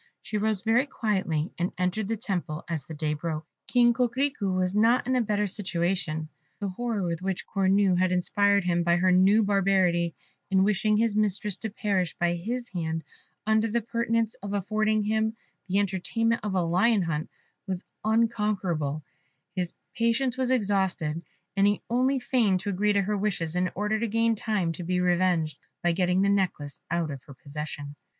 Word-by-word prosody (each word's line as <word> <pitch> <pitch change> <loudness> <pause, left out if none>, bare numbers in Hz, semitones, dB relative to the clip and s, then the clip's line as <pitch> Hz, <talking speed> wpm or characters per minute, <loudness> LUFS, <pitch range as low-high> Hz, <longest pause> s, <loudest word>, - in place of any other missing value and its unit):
She 210 - -2
arose 215 -2 0
very 235 +5 +2
quietly, 190 - -1
and 175 +1 -1
entered 185 +3 0
the 225 +1 -1
temple 175 -7 -3
as 165 -4 -4
the 160 - -7
day 150 0 -1
broke. 155 0 -4 0.2
King 240 -1 +4
Coquerico 250 -3 0
was 185 +1 0
not 230 +4 +4
in 260 - +1
a 250 - +3
better 210 -2 0
situation. 175 -5 -1 0.3
The 200 -2 -2
horror 225 +1 -2
with 170 -1 -2
which 190 -1 -3
Cornue 195 -1 +2
had 185 0 +2
inspired 200 +2 +2
him 175 -1 +1
by 170 0 +3
her 185 +1 +3
new 195 +4 +5
barbarity 190 -4 +2 0.3
in 190 -1 +4
wishing 210 +1 +2
his 225 -1 +1
mistress 210 -1 0
to 220 - -4
perish 195 -4 -1
by 175 0 +1
his 235 +8 -3
hand 165 -3 -3 0.4
under 220 +1 +3
the 230 +2 +1
pretence 230 0 0
of 200 0 -5
affording 215 +2 +1
him 220 +1 0 0.3
the 190 +1 +1
entertainment 205 +4 0
of 205 -3 -2
a 180 - +2
lion 190 +5 +3
hunt, 160 -2 -2 0.4
was 185 -1 -4 0.2
unconquerable: 210 -9 0 0.5
his 180 -2 -1 0.2
patience 235 +2 +1
was 260 -1 0
exhausted, 190 -9 0 0.3
and 200 0 +4
he 205 0 0
only 260 +3 +2
feigned 240 -7 +2
to 205 - -2
agree 205 +2 +2
to 200 -1 +2
her 210 +2 -1
wishes 190 -5 -1
in 180 0 +1
order 210 +2 0
to 235 - 0
gain 230 +1 +2
time 210 -6 -1
to 165 - -6
be 180 +1 0
revenged, 175 -3 +1 0.2
by 175 - +3
getting 180 +2 +2
the - - +3
necklace 185 -8 -1
out 170 -2 -1
of 135 -2 -7
her 140 - -12
possession. 145 0 -7
195 Hz, 180 wpm, -27 LUFS, 175-220 Hz, 0.5 s, new